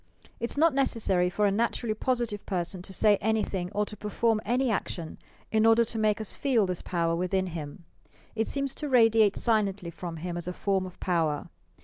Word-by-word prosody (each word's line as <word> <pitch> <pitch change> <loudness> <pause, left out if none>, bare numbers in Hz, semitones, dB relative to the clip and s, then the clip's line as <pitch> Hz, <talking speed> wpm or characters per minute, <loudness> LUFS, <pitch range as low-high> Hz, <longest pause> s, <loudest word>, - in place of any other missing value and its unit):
It 235 - -2
is - - -5
not 320 0 +4
necessary 215 -9 +1
for 210 +3 0
a 200 - +3
naturally 230 +1 0
positive 235 -3 -1
person 180 -1 -2
to 185 - -11
say 205 +2 +4
anything 200 -4 -1
or 210 +1 0
to 210 - -9
perform 215 +2 0
any 250 +2 +1
action 170 -5 -4 0.3
in 220 0 +3
order 225 +1 +5
to 225 0 -5
make 215 0 +2
us 220 - -4
feel 255 -8 +2
this 180 -2 -3
power 165 -2 0
within 185 +2 0
him. 165 -1 -7 0.5
It 225 0 -1
seems 275 -1 -2
to 300 - -2
radiate 225 -5 +5
silently 200 -6 0
from 165 +1 -7
him 175 +2 -4
as 175 0 -3
a 180 - -2
form 190 0 0
of 180 - -14
power. 160 -5 0
205 Hz, 200 wpm, -28 LUFS, 180-225 Hz, 0.5 s, order